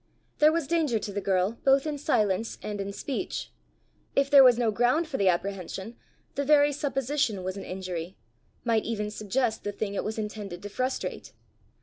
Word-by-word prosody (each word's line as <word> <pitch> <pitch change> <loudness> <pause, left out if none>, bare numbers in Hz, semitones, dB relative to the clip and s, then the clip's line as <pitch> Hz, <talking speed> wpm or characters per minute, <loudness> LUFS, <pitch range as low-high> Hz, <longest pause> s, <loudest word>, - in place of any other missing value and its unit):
There 305 +1 +7
was 330 -2 0
danger 310 -6 +1
to 205 -1 -5
the 205 - -2
girl 190 +3 0
both 270 +1 +4
in 300 -2 -3
silence 220 -7 +1
and 205 -1 -3
in 195 0 -4
speech: 280 - -4 0.6
if 275 0 +2
there 280 -1 +10
was 250 -2 +7
no 235 -2 +2
ground 245 +9 +2
for 285 -4 -3
the 195 -2 +4
apprehension, 190 +4 -3 0.4
the 280 - -1
very 290 0 +5
supposition 270 -6 -1
was 185 +1 -3
an 195 - -6
injury 185 -1 -5 0.5
might 230 -2 +2
even 210 -2 -3
suggest 220 +2 -1
the 205 - -2
thing 200 0 -4
it - - -2
was 220 +1 -4
intended 210 -4 -5
to 205 - -5
frustrate! 255 +5 -3
220 Hz, 185 wpm, -27 LUFS, 200-275 Hz, 0.6 s, there